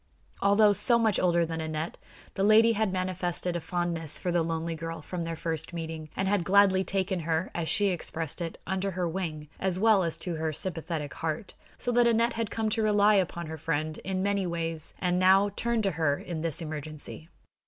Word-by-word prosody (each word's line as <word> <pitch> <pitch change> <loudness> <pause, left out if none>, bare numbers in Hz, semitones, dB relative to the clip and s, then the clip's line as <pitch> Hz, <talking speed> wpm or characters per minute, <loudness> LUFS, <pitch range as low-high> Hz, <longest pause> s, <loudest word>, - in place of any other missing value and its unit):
Although 205 +1 +5
so 235 +4 +3
much 220 -4 +2
older 170 -2 +3
than 160 0 -4
Aneth, 160 +1 -3 0.4
the - - -3
lady 215 +3 +6
had 220 -2 0
manifested 180 -1 -2
a - - 0
fondness 170 -2 -1
for 180 - -2
the 175 -1 +2
lonely 165 0 -2
girl 165 0 -5
from 180 +2 -5
their 165 0 -3
first 160 0 -2
meeting, 160 -2 -5
and 190 - -1
had 200 -2 +1
gladly 190 0 +4
taken 190 -1 0
her, 165 +2 -1
as 165 -2 -2
she 205 -1 +3
expressed 165 -2 -2
it, 165 -1 -4
"under 190 +1 -1
her 180 -1 -2
wing," 160 -4 -4
as 185 -2 +1
well 215 0 +4
as 165 -3 +1
to 175 -3 -3
her 160 0 -1
sympathetic 160 -2 -3
heart; 160 +4 -4 0.2
so 245 - -1
that 240 0 +4
Aneth 230 +1 +2
had 230 -2 -2
come 220 -1 -1
to 220 +1 +1
rely 210 -1 +4
upon 175 -3 0
her 160 0 -6
friend 155 0 -2
in 190 0 -3
many 200 -2 0
ways, 165 -2 -3
and 180 -1 0
now 190 +2 +5
turned 235 -2 0
to 195 - +1
her 155 -3 +1
in 170 -3 -6
this 165 +1 0
emergency. 155 +1 -6
175 Hz, 205 wpm, -28 LUFS, 160-195 Hz, 0.4 s, lady